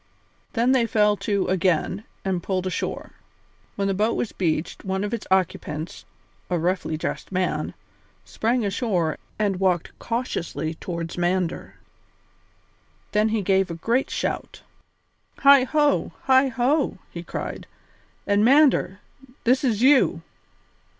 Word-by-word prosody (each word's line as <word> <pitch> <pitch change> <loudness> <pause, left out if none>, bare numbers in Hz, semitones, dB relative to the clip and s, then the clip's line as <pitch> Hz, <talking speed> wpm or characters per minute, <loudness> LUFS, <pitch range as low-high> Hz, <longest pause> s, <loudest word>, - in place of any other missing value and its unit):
Then 240 +2 +2
they 250 -3 +3
fell 210 -2 +3
to 200 -2 0
again 185 +2 0 0.2
and 185 -2 0
pulled 185 0 -2
ashore. 185 - -3 0.6
When 200 -1 -1
the 195 - +1
boat 210 +4 +1
was 230 - -2
beached 165 -2 -2
one 190 0 -2
of 205 +2 -3
its 230 - -4
occupants, 165 -4 -1 0.4
a 180 - +1
roughly 170 -1 -1
dressed 160 - -4
man, 185 -1 -1 0.5
sprang 235 +1 0
ashore 190 -6 -1 0.2
and 200 -3 0
walked 180 -3 +1
cautiously 205 -9 -3
towards 170 +1 -5
Mander; 175 0 -1 1.4
then 210 +1 +2
he 215 -2 0
gave 190 0 +2
a 170 - -4
great 235 +10 0
shout. - - -4 0.8
"Heigho, 280 +2 +4
heigho!" 265 +1 +3
he 170 - -6
cried, 175 - -6 0.6
"and 205 +1 +2
Mander, 260 -6 +4 0.4
this 255 +3 +3
is 235 -3 +1
you!" 270 +1 +4
200 Hz, 125 wpm, -24 LUFS, 180-240 Hz, 1.4 s, Heigho